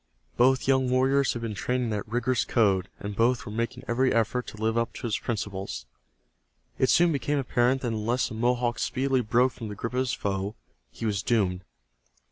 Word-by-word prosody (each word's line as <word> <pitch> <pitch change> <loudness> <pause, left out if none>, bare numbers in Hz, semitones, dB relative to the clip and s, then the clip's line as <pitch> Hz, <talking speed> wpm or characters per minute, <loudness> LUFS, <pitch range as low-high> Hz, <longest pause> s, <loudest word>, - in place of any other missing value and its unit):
Both 130 +2 +3
young 130 -1 +3
warriors 135 +2 +3
had 120 - -5
been 115 -2 -3
trained 125 +5 -1
in 120 - -1
that 105 0 -3
rigorous 120 +2 0
code, 100 -5 +2
and 100 0 -5
both 120 +3 +2
were - - -6
making 115 +3 -3
every 130 +2 +2
effort 115 +2 0
to - - -9
live 110 +1 0
up 115 -1 0
to - - -6
its 110 - 0
principles. 100 - -4 0.9
It 130 - +3
soon 175 0 +5
became 145 0 0
apparent 130 0 +1
that 120 - 0
unless 115 +3 0
the - - -7
Mohawk 120 0 0
speedily 130 0 +1
broke 120 +3 +2
from 115 -3 -8
the 105 - -6
grip 115 +4 -5
of 125 - 0
his 130 -1 0
foe 100 0 -2 0.3
he 115 - -7
was 100 -3 0
doomed. 95 -6 +1
120 Hz, 200 wpm, -27 LUFS, 110-130 Hz, 0.9 s, soon